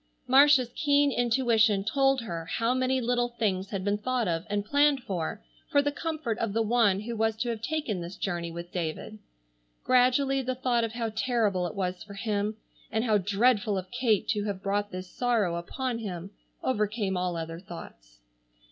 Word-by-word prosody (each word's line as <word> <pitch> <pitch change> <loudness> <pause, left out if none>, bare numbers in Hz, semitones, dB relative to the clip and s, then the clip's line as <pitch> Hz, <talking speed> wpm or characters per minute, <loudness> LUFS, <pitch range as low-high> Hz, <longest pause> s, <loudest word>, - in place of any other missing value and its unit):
Marcia's 265 -1 +6
keen 285 -1 +3
intuition 230 -4 +3
told 270 +4 +2
her 170 -7 -5
how 230 +7 0
many 255 0 +1
little 245 0 +1
things 195 -4 0
had 195 -2 -4
been 205 0 +1
thought 250 0 0
of 165 0 -2
and 205 0 -1
planned 285 +3 +3
for, 170 - -4 0.3
for 285 - +4
the 290 0 +2
comfort 300 -7 -3
of 225 -3 -1
the 225 - +1
one 215 -4 +3
who 230 +2 -5
was 220 0 +1
to 240 +2 -2
have 225 -2 -3
taken 235 - -2
this 170 +2 -7
journey 175 -3 -2
with 170 +1 -8
David. 175 +5 -4 0.6
Gradually 255 +2 +3
the 255 0 -2
thought 245 -2 +1
of 225 -1 -2
how 230 -1 -2
terrible 215 -8 +1
it 165 - -8
was 185 -2 -2
for 200 -1 -10
him, 210 0 -2 0.3
and 220 +1 0
how 215 -4 +3
dreadful 205 +1 +2
of 185 0 -6
Kate 240 -4 +1
to 210 -2 0
have 200 -2 -4
brought 205 +1 0
this 185 0 -6
sorrow 225 -4 0
upon 235 +8 -3
him, 190 -3 -6 0.3
overcame 210 -4 0
all 180 -1 -1
other 165 0 -5
thoughts. - - -12
220 Hz, 185 wpm, -28 LUFS, 190-250 Hz, 0.6 s, Marcia's